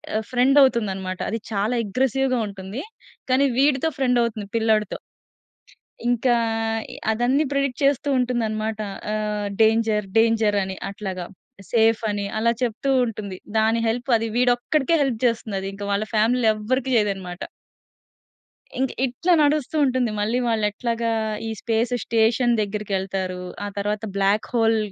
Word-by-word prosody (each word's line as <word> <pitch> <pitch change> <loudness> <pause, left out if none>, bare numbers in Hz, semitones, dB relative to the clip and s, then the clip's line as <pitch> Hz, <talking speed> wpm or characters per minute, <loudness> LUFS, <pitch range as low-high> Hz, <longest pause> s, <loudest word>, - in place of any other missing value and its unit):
ఆహ్, 220 -1 -1
ఫ్రెండ్ 255 +3 +3
అవుతుందన్నమాట. 195 -7 0
అది 225 - -2
చాలా 210 +4 0
అగ్రెసివ్‌గా 255 +3 0
ఉంటుంది. 195 +6 -7 0.5
కానీ, 275 +2 +4
వీడితో 285 +2 +3
ఫ్రెండ్ 250 -2 +2
అవుతుంది 215 -3 -3
పిల్లాడితో... 220 -1 +1 1.1
ఇంకా 245 +1 +2 0.6
ఇ - - -10 0.2
అదన్నీ 245 +6 +2
ప్రెడిక్ట్ 275 -1 -1
చేస్తూ 280 +1 +2
ఉంటుందన్నమాట. 220 -3 -1 0.3
ఆహ్, 210 -1 -2
డేంజర్ 220 -2 +3
డేంజర్ 225 -2 +3
అని 190 0 -5
అట్లాగా. 190 -3 -5 0.5
సేఫ్ 225 -1 +3
అని 205 -1 -2
అలా 235 +1 +2
చెప్తూ 245 +3 -1 0.2
ఉంటుంది. 205 -4 -6 0.2
దాని 220 +1 +3
హెల్ప్ 245 +4 -2
అది 225 +1 -2
వీడొక్కడికే 250 +5 +2
హెల్ప్ 245 -5 -1
చేస్తుంది 225 -4 0
అది. 195 - -5
ఇంక 200 +1 -8
వాళ్ళ 200 +2 0
ఫ్యామిలీలో 225 +1 +3
ఎవ్వరికి 255 +5 -1
చేయదన్నమాట. 195 -4 -1 1.4
ఇంక 265 -1 +1 0.2
ఇట్ల 265 +9 -1
నడుస్తూ 295 0 +1
ఉంటుంది 255 -3 +1
మళ్ళీ 225 +4 0
వాళ్ళెట్లాగా 230 +1 -1 0.4
ఈ - - -3
స్పేస్ 230 +1 0
స్టేషన్ 230 +2 +2
దెగ్గిరికెళ్తారూ. 195 -3 -2 0.3
ఆ - - -3
తర్వాత 210 +2 -2
బ్లాక్ 200 +2 +1
హోల్ 225 -1 +3
225 Hz, 130 wpm, -23 LUFS, 210-250 Hz, 1.4 s, కానీ